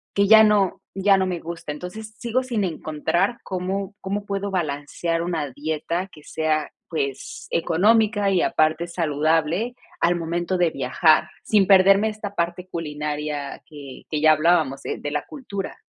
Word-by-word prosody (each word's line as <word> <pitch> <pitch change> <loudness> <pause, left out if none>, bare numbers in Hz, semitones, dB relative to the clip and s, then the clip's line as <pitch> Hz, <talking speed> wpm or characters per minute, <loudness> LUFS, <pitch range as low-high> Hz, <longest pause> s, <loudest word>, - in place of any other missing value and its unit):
que 200 0 +3
ya 220 +1 +9
no 210 -3 +2
ya 195 +1 +4
no 190 0 +1
me 180 -2 -2
gusta. 165 -2 -6
Entonces, 215 +8 -8
sigo 240 +3 0
sin 235 -5 -1
encontrar 175 +6 -1
cómo 190 +2 -3
cómo 200 +1 -3
puedo 200 0 -3
balancear 165 0 -2
una 160 -5 -2
dieta 160 +6 -3
que 150 - -15
sea, 155 -1 -1 0.2
pues 140 -5 -4
económica 205 +5 +3
y 185 - +3
aparte 155 +2 +1
saludable 165 +6 0 0.3
al 175 +1 +3
momento 175 +2 -2
de 175 -2 +2
viajar, 155 +4 +3
sin 205 -3 +3
perderme 195 +2 +6
esta 210 -1 -7
parte 175 +1 -2
culinaria 150 -3 -4
que 140 -4 -11
que 155 - -1
ya 155 0 +7
hablábamos, 155 -3 +2
eh, - - -2
de - - -14
de 145 - -4
la 150 0 -1
cultura. 205 -9 -6
175 Hz, 160 wpm, -23 LUFS, 155-200 Hz, 0.3 s, ya